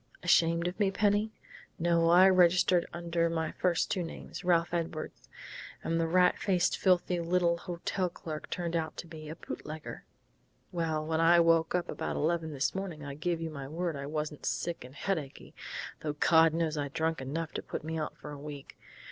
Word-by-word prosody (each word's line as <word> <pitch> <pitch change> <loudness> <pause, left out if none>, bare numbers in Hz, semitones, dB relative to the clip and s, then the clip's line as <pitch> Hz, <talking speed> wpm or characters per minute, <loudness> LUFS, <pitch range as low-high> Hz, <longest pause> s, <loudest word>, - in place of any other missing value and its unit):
"Ashamed 170 -1 +4
of 180 - -5
me, 200 -2 +3
Penny?... 205 +2 +2 0.5
No, 170 0 +3
I 180 +2 +8
registered 180 -1 +4
under 170 -1 0
my 160 -1 -1
first 175 -2 0
two 185 - 0
names 165 - -7
Ralph 170 -1 +2
Edwards. 165 -2 -4 0.5
And 165 0 0
the 165 - +1
rat 180 +2 +4
faced, 185 -3 +2
filthy 180 -1 +2
little 170 0 +2
hotel 180 +1 -2
clerk 155 -2 -7
turned 170 -1 -2
out 160 -2 -2
to - - -6
be 155 -2 -9
a 160 - -5
bootlegger.... 155 -2 -7 0.7
Well, 160 -3 -1
when 160 0 0
I 170 +1 +6
woke 165 0 +4
up 180 - 0
about - - -3
eleven 160 0 0
this 140 -1 0
morning 180 -6 -5
I 140 - -5
give 165 +3 -2
you 165 -1 -4
my 140 -3 -6
word 165 +2 -2
I 140 0 -5
wasn't 150 0 -4
sick 170 -1 -2
and 130 +2 -12
headachy, 155 -5 -4 0.5
though 150 -1 -3
God 160 +1 +5
knows 160 -2 0
I'd 140 -1 -3
drunk 160 -2 0
enough 155 +5 -3
to - - -4
put - - -6
me 160 +1 -3
out 155 - -4
for 150 - -9
a 145 - -8
week.... 145 -1 -9
165 Hz, 190 wpm, -31 LUFS, 155-175 Hz, 0.7 s, I